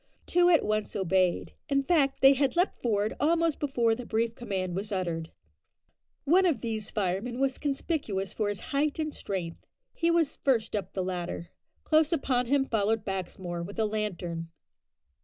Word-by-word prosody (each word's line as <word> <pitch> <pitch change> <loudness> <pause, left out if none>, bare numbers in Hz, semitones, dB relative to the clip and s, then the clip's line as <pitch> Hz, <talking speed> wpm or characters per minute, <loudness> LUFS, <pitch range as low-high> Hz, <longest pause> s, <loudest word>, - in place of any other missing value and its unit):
Two 355 0 +4
at 335 -3 +4
once 215 0 -1
obeyed. 185 -2 +1 0.2
In 275 -1 +2
fact, 280 -4 +2
they 270 +1 +8
had 275 +2 +1
leaped 355 +3 +1
forward 215 -2 +1
almost 330 0 +2
before 240 -6 +2
the 250 +2 -5
brief 230 0 0
command 190 -7 -3
was 205 +3 -3
uttered. 170 -4 -2 0.9
One 365 +5 +4
of 290 -10 0
these 220 -3 -3
firemen 210 +5 -2
was 270 -1 0
conspicuous 270 - -2
for 210 -2 -1
his 205 - -3
height 290 +2 +1
and 310 -2 -2
strength. 175 -4 -5 0.3
He 335 - +1
was 335 -3 +2
first 230 -6 +1
up 205 - -3
the 190 - -1
ladder. 175 -2 -4 0.3
Close 310 -1 +3
upon 255 -6 +1
him 275 +1 +3
followed 220 -2 0
Baxmore 185 -2 -4
with 195 +4 -7
a 220 - +2
lantern. 180 -6 -3
225 Hz, 165 wpm, -29 LUFS, 190-280 Hz, 0.9 s, they